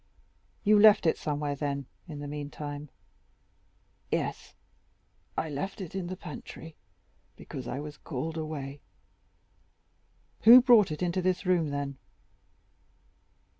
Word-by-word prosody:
"You 210 0 +5
left 210 -2 +7
it 160 - +4
somewhere, 145 -1 -2
then, 140 -1 -3 0.2
in 150 -3 -7
the 145 - -5
meantime?" 145 0 -6 1.2
"Yes; - - -3 0.8
I - - 0
left 155 +8 -4
it 185 -3 -7
in 190 -2 -3
the 185 +1 -5
pantry, 160 -3 -9 0.6
because 130 +3 -8
I 135 - -3
was 150 -1 -7
called 160 +3 -4
away." 145 -3 -5 1.6
"Who 235 +3 +10
brought 240 -5 +6
it 155 +4 -3
into 180 +1 0
this 185 +2 0
room, 175 -4 +2
then?" 140 -1 -4
155 Hz, 120 wpm, -29 LUFS, 145-185 Hz, 1.6 s, Who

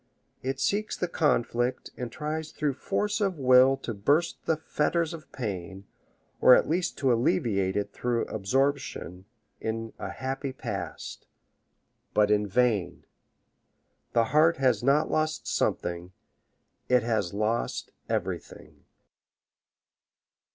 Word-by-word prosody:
It 135 +1 -3
seeks 205 +9 0
the 180 - -1
conflict, 125 -6 0
and 125 -2 -5
tries 155 +3 -4
through 150 -2 -1
force 210 - -1
of 195 -4 0
will 130 0 +6
to 115 - -3
burst 145 +12 0
the 160 - +2
fetters 160 +2 0
of 160 -2 -10
pain, 95 -4 -5 0.5
or 125 - +8
at - - +2
least 175 +3 -1
to 130 -3 +3
alleviate 100 -4 +1
it 100 - -2
through 120 -1 -1
absorption 120 -4 -1 0.3
in 115 0 -4
a - - -4
happy 135 +1 -4
past. - - -6 0.9
But 105 0 +4
in 105 0 +2
vain! 105 -2 +1 1.1
The 115 - +4
heart 160 +2 +5
has 125 -6 +2
not 140 +4 +3
lost 155 0 0
something 90 +1 -1 0.8
it 125 -2 +4
has 110 -6 0
lost 110 +3 -1 0.2
everything. - - -4
125 Hz, 120 wpm, -28 LUFS, 110-150 Hz, 1.1 s, or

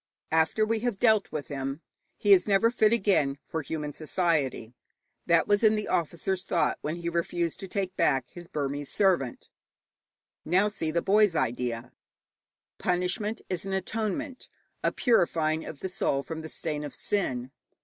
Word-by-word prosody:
After 160 +7 +3
we 225 +1 0
have 240 -3 -1
dealt 220 -2 +3
with 145 -3 -4
him, 135 +2 -4 0.4
he 205 -1 +5
is 185 0 +4
never 210 +3 +4
fit 215 -3 +3
again 190 -11 +2
for 160 - -4
human 150 0 -4
society. 155 -8 -1 0.5
That 170 -1 +4
was 205 +1 +3
in 215 0 +6
the 210 - -2
officer's 175 +3 -1
thought - - 0
when 155 +2 -2
he 170 0 -5
refused 170 0 -1
to 195 - -6
take 190 -1 -3
back 135 -2 +2
his 175 -1 -10
Burmese 145 -1 -3
servant. 180 - +1 0.9
Now 190 +5 +3
see 180 -6 -3
the 170 +2 0
boy's 205 -2 +4
idea. 120 -3 -2 0.9
Punishment 180 +5 -1
is 185 -3 -3
an 195 0 -4
atonement, 220 - -3 0.3
a - - +2
purifying 165 -9 +2
of 145 - -8
the - - -2
soul 180 -8 0
from 160 +3 -6
the 160 - -8
stain 150 -2 -3
of 145 - -6
sin. 130 -12 -1
175 Hz, 160 wpm, -28 LUFS, 150-205 Hz, 0.9 s, in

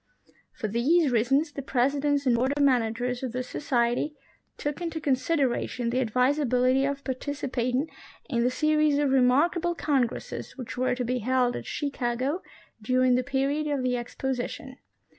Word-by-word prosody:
For 215 - -4
these 270 - +2
reasons 270 +7 +2
the 280 - -5
President 280 +2 +1
and 250 -2 +4
Board 260 +4 +1
of 290 - +3
Managers 245 -1 +1
of 255 -3 -4
this 255 0 -3
Society 245 +2 0 0.4
took 295 +3 -3
into 330 -2 -3
consideration 260 -4 0
the 255 - +1
advisability 255 +1 +2
of 280 0 -3
participat 260 -2 -2
ing 280 +5 0 0.4
in 240 -6 0
the 250 - +3
series 305 +1 +2
of 290 -2 +2
remarkable 300 +7 +3
congresses 270 -6 -2
which 250 -3 -6
were 255 0 +1
to 250 -1 -2
be 250 +1 -1
held 250 +1 +1
at - - -6
Chicago 275 +2 -2 0.4
during 255 +3 +3
the 250 - +3
period 280 +3 0
of 285 -3 -1
the 250 -1 +1
Exposition. 260 +3 -4
260 Hz, 155 wpm, -27 LUFS, 245-285 Hz, 0.4 s, and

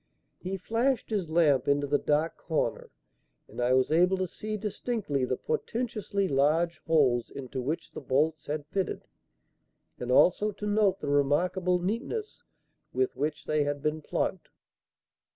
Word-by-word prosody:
He 190 +1 -4
flashed 230 +6 0
his 195 -7 -1
lamp 155 -6 +3
into 145 0 +2
the 145 0 +1
dark 155 +2 +1
corner, 160 -3 -2 0.6
and - - -6
I 125 +1 +3
was 130 +2 +3
able 180 +4 +4
to 185 - 0
see 215 +4 -5
distinctly 205 - -2
the 130 0 -1
portentously 215 -4 -2
large 155 +4 +2
holes 135 -7 +3
into 130 -1 -6
which 150 +6 -3
the - - -7
bolts 150 +4 0
had 150 0 -3
fitted, 190 +5 -2 1.0
and 125 0 -3
also 185 +10 +5
to 210 - -7
note 205 -2 +2
the - - -4
remarkable 175 +6 +2
neatness 235 - -3 0.5
with 390 -1 0
which 150 +1 -2
they 155 -1 +1
had 145 0 -3
been 155 +1 -1
plugged. - - -2
160 Hz, 150 wpm, -29 LUFS, 145-200 Hz, 1.0 s, also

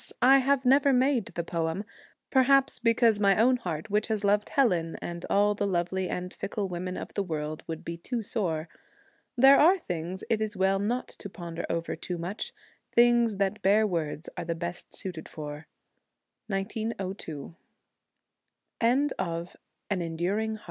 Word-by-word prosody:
I 270 +2 +8
have 270 0 +1
never 275 +2 +5
made 255 -3 +3
the 170 - -4
poem, 165 +3 -2 0.5
perhaps 270 +1 +4
because 230 -2 +3
my 200 -2 +4
own 250 +4 +4
heart, 175 -4 -5
which 210 +1 +1
has 215 -2 -1
loved 205 +1 +2
Helen 180 -12 +1
and 170 0 -6
all 205 +1 +3
the 205 0 -1
lovely 185 0 -1
and 180 +1 -4
fickle 200 -1 -3
women 180 0 -4
of - - -7
the 200 - 0
world, 155 -4 -4
would 160 -1 -6
be 170 0 -4
too 230 +7 -4
sore. 175 -7 -2 0.7
There 270 +3 +8
are 355 +6 +6
things 180 - -5
it 225 -2 +1
is 215 -2 -2
well 190 +1 +2
not 235 +5 -1
to 200 - -9
ponder 170 -2 -6
over 165 0 -2
too 180 - -5
much, 175 +5 -4 0.4
things 235 -2 +4
that 200 +2 -1
bare 205 +3 +4
words 165 -4 -2
are 175 - -4
the 170 0 -2
best 170 +1 -5
200 Hz, 140 wpm, -28 LUFS, 170-235 Hz, 0.7 s, I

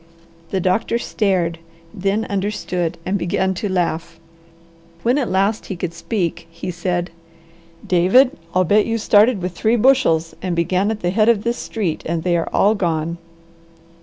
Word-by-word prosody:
The 190 - -1
doctor 185 +6 +1
stared, 185 -8 -1 0.3
then 200 +2 -1
understood, 190 -4 -2
and 195 +2 0
began 190 +2 0
to 200 +2 -3
laugh. 170 -3 -2 0.8
When 250 +5 +2
at 255 - -1
last 195 +4 0
he 190 - -4
could 170 -1 -4
speak 170 -6 -3
he 170 +2 -6
said, 175 0 -2 0.7
"David, 190 +9 +4 0.2
I'll 185 - +4
bet 205 +4 +3
you 230 0 0
started 210 -1 +3
with 180 - -2
three 220 +6 +1
bushels 210 -10 +3
and 185 -2 -2
began 185 +4 +1
at 220 -1 -3
the 175 - 0
head 215 +3 +3
of 215 -3 +3
this 235 +1 -1
street, 195 -8 -3
and 165 0 -2
they 175 -1 +1
are 165 - -1
all 205 +2 +3
gone." 170 -4 -2
185 Hz, 165 wpm, -20 LUFS, 175-215 Hz, 0.8 s, David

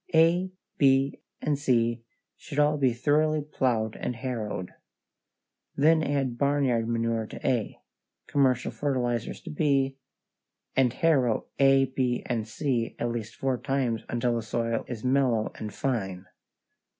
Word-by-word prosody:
A, 170 +3 +4 0.3
B, 135 0 +3 0.2
and 145 -2 0
C 120 -4 +1 0.3
should 145 - -9
all 150 0 +3
be 130 -3 +3
thoroughly 150 +5 +1
plowed 120 -7 0
and 125 - -3
harrowed. 110 -7 -4 1.0
Then 160 +3 +4
add 135 -5 -1
barnyard 135 -5 +1
manure 115 -1 0
to - - -6
A, 125 -5 0 0.5
commercial 130 -3 +1
fertilizers 125 -5 -2
to 170 - -8
B, 135 -3 +1 0.8
and 130 -2 +4
harrow 130 -6 +2
A, 135 -1 +5
B, 130 -2 -1
and 115 -3 -2
C 120 -1 -1
at 120 - -1
least 115 -2 -5
four 130 -2 -1
times 130 -5 -1
until 120 0 0
the - - -2
soil 115 +1 -2
is 115 -3 -6
mellow 125 -4 +2
and 105 -1 -5
fine. 100 -8 -2
130 Hz, 135 wpm, -27 LUFS, 115-140 Hz, 1.0 s, A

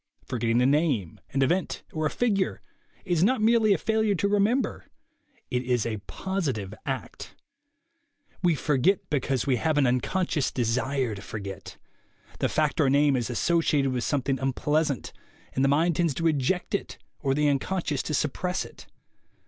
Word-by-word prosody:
Forgetting 120 0 +1
a - - +3
name, 135 - +1
an 135 0 +2
event 175 +7 0
or 155 -1 0
a - - -2
figure, 200 -3 0 0.5
is 175 -3 +2
not 255 +5 +3
merely 215 -2 +4
failure 220 +3 +1
to 200 - +1
remember; 205 +6 +1 0.7
it 125 - +1
is 125 -3 0
a 110 -2 -2
positive 135 - -3
act. 135 -1 -5 1.1
We 175 -3 +3
forget 150 +7 +1
be 145 - +2
cause 130 -1 -1
we 130 -3 +2
have 155 +5 0
an 145 - +4
unconscious 140 +5 0
desire 125 +1 0
to 100 - -8
forget; 100 -2 -7 0.6
the - - +1
fact - - +1
or - - +4
name 140 0 +4
is 120 -2 -1
associated 145 +1 +2
with 125 -2 -1
something 135 -2 0
unpleas 150 +4 +1
ant, 135 -6 -4 0.4
and 130 - +1
the 135 - +4
mind 160 +3 +2
tends 170 -6 +1
to 165 - -2
eject 160 +6 0
it 200 - -2 0.2
or 135 -2 0
the 150 +1 +2
uncon 145 +6 0
scious 145 -3 -1
to 155 - -1
suppress 180 +6 -1
it. - - -14
145 Hz, 165 wpm, -26 LUFS, 130-180 Hz, 1.1 s, merely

